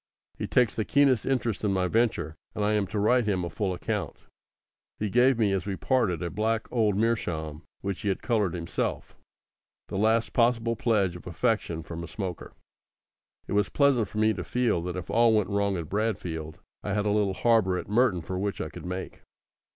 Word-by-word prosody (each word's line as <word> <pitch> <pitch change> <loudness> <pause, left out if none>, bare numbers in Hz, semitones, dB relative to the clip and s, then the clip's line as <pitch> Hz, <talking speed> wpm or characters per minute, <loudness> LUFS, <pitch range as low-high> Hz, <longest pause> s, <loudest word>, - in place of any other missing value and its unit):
He - - -2
takes 125 -5 +3
the 110 - -1
keenest 140 -2 +3
interest 120 -6 0
in 105 - +2
my 95 -1 +1
venture, 110 -7 0 0.2
and 105 - 0
I 105 - +2
am 105 -2 +1
to 105 - -4
write 115 +4 +3
him 95 -4 0
a 85 - -5
full 100 -4 -1
account. 90 - -4 0.7
He 105 -2 -2
gave 125 +2 +4
me 105 -3 +2
as 95 0 -1
we 100 - -1
parted 95 - 0
a 85 - -3
black 110 +1 -1
old 110 -5 +2
meerschaum 85 -9 -1 0.2
which 100 -1 -3
he 105 - -1
had 95 - -2
coloured 105 -7 +1
himself 85 -1 -3 0.7
the 95 - -2
last 110 +2 +2
possible 115 -1 +2
pledge 105 -6 +1
of 90 - -10
affection 85 -2 -1
from 85 +1 -7
a - - -6
smoker. 95 -1 -6 0.9
It - - -4
was 105 0 +2
pleasant 140 -7 +3
for 105 - -9
me 110 0 +3
to 90 -3 -5
feel 120 -2 0
that 90 0 -4
if 90 - -6
all 115 -1 +4
went 105 -3 +1
wrong 100 -1 +1
at 85 -3 -5
Bradfield, 90 -7 -3 0.2
I 100 - -3
had 105 0 0
a 105 - +2
little 100 -2 +1
harbour 110 -6 +3
at - - -5
Merton 105 -3 +2
for 90 +3 -4
which 100 +1 -2
I - - -3
could 80 - -9
make. 90 +1 -6
105 Hz, 205 wpm, -27 LUFS, 90-115 Hz, 0.9 s, gave